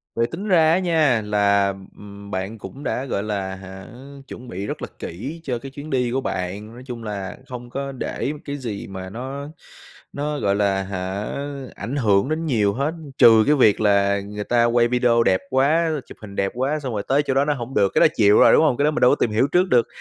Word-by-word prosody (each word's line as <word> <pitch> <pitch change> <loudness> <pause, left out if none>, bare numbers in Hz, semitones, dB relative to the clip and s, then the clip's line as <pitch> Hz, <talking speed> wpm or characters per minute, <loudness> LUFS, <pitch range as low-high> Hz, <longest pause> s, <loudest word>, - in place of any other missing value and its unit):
Vậy 115 0 +1
tính 190 - -6
ra 160 -5 +4
á 180 - +3
nha 155 -10 +2
là, 100 -1 +2 0.3
ừm, 100 0 -11
bạn 95 +4 -4
cũng 120 +8 -10
đã, 130 - -2
gọi 105 -6 -2
là, 100 -3 -3
hả, 95 0 -10 0.4
chuẩn 125 - -10
bị 100 -2 -5
rất - - -5
là - - -4
kỹ 135 - -6
cho 125 -5 -3
cái 135 +1 -9
chuyến 145 +3 -9
đi 125 -2 0
của 135 +2 0
bạn. 100 +4 -4
Nói 125 - -11
chung 120 -3 -7
là, 100 -3 -5
không 120 -1 -8
có 140 +2 -4
để 135 +1 -3
m 150 - -9
cái 145 0 -4
gì 115 -7 -6
mà 95 -1 -7
nó 135 +6 -6 0.7
nó, 150 +1 -3
gọi 100 0 +1
là, 100 -1 +1
hả, 95 +1 -4 0.5
ảnh 135 - -5
hưởng 105 -1 +2
đến 160 +1 -2
nhiều 105 -8 +1
hết, 140 +6 -1 0.3
trừ 110 -1 +7
cái 150 - +5
việc 110 -7 +4
là 100 -1 +3
người 105 +1 -6
ta 120 +1 +2
quay 120 0 +3
video 120 -1 +3
đẹp 95 - +2
quá, 145 +5 +2 0.2
chụp - - -12
hình 100 -2 -10
đẹp 100 0 0
quá 140 +5 -1
xong 130 -5 -5
rồi 100 - -2
tới 140 +2 +2
chỗ 135 - -1
đó 135 +2 +2
nó 150 - +1
hổng 130 -1 -6
được, 100 -1 +2
cái - - +5
đó - - +8
chịu 105 -1 +5
rồi, - - +7
đúng - - +5
hông? 145 -6 +2
Cái 140 - +2
đó 150 - +3
mình 155 - -3
đâu 125 - +6
có - - +4
tìm 110 - 0
hiểu 115 +6 +2
trước 185 +1 +3
được, 120 -5 +3
120 Hz, 245 wpm, -22 LUFS, 100-140 Hz, 0.7 s, đó